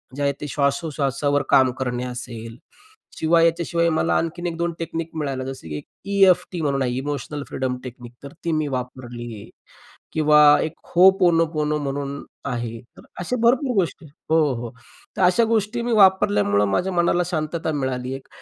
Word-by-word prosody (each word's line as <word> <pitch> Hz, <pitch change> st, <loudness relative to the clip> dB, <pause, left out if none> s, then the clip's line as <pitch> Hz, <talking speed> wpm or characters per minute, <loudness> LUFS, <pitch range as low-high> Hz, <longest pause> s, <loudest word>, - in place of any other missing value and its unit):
जे 145 Hz, -, -5 dB
आहे 140 Hz, -, +2 dB
ते 150 Hz, -, -4 dB
श्वासोश्वासावर 140 Hz, -1 st, 0 dB
काम 130 Hz, -2 st, +5 dB
करणे 125 Hz, -1 st, -2 dB
असेल. 120 Hz, -2 st, -7 dB, 0.6 s
शिवाय 165 Hz, +1 st, +4 dB
याच्याशिवाय 170 Hz, 0 st, +1 dB
मला 160 Hz, -, +1 dB
आणखीन 175 Hz, +2 st, -2 dB
1-2 170 Hz, 0 st, -2 dB
टेक्नीक 165 Hz, 0 st, -4 dB
मिळाल्या 135 Hz, -4 st, -3 dB
जसं 130 Hz, -11 st, -7 dB
की 75 Hz, -, -5 dB
एक -, -, -9 dB, 0.3 s
ई-एफ-टी 180 Hz, -3 st, +3 dB
म्हणून 140 Hz, -3 st, 0 dB
आहे 125 Hz, -, 0 dB
इमोशनल 145 Hz, +1 st, -4 dB
फ्रीडम 130 Hz, 0 st, -2 dB
टेक्निक, 120 Hz, -1 st, -10 dB
तर 140 Hz, -, -9 dB
ती 165 Hz, -, +1 dB
मी 155 Hz, -1 st, 0 dB
वापरली. 120 Hz, -4 st, -6 dB, 0.6 s
किंवा 150 Hz, -1 st, +4 dB, 0.2 s
एक 160 Hz, -, -2 dB, 0.2 s
Ho'oponopono 165 Hz, -5 st, +4 dB
म्हणून 140 Hz, 0 st, -4 dB, 0.2 s
आहे. 120 Hz, -3 st, -4 dB, 0.2 s
तर -, -, -14 dB, 0.2 s
असे 215 Hz, +8 st, -2 dB
भरपूर 250 Hz, +2 st, +3 dB
गोष्टी 170 Hz, -3 st, -1 dB, 0.2 s
हो, 160 Hz, -, +4 dB, 0.2 s
हो. 115 Hz, -1 st, -5 dB, 0.5 s
तर -, -, -1 dB
अशा 180 Hz, +6 st, +4 dB
गोष्टी 220 Hz, +3 st, -1 dB
मी 240 Hz, 0 st, -1 dB
वापरल्यामुळं 105 Hz, -, +4 dB
माझ्या 190 Hz, -, 0 dB
मनाला 175 Hz, 0 st, +2 dB
शांतता 160 Hz, -1 st, -2 dB
मिळाली 130 Hz, -3 st, -2 dB
एक 135 Hz, -, -10 dB
150 Hz, 155 wpm, -22 LUFS, 130-170 Hz, 0.6 s, काम